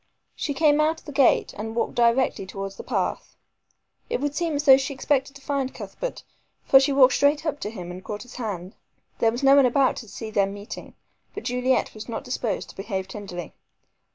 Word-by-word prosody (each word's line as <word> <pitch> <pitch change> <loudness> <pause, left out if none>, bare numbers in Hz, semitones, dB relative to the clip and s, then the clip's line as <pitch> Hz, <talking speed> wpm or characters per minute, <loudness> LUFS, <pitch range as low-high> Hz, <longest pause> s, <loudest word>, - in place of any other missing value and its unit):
She 285 - -3
came 300 0 +4
out 315 +1 +1
of - - -28
the 295 - -7
gate 275 -3 +3
and 220 +1 -5
walked 235 - -1
directly 235 -4 +2
towards 195 +1 -6
the - - -8
path. - - -2 0.7
It - - -1
would 290 +1 -1
seem 330 0 -1
as 290 - -1
though 270 -2 +9
she 275 +1 -3
expected 275 +1 0
to 280 - -13
find 275 -2 -2
Cuthbert, - - -6 0.4
for 270 - +7
she 275 +2 +2
walked 265 -2 +6
straight 290 +2 +2
up 295 -2 -2
to - - -4
him 180 -5 -7
and 185 +1 -9
caught 205 -1 -6
his 250 - -12
hand. 195 -6 -5 0.5
There 225 - +4
was 240 +4 -5
no 275 0 +7
one 275 -2 +6
about 265 +2 +2
to 230 - -8
see 220 +2 -7
their 200 -2 +2
meeting, 200 +1 -8 0.4
but 415 - -5
Juliet 250 +1 0
was 215 +2 -9
not 230 - -4
disposed 250 -5 -3
to - - -23
behave 195 -1 -4
tenderly. 185 -5 -7
250 Hz, 210 wpm, -25 LUFS, 210-280 Hz, 0.7 s, though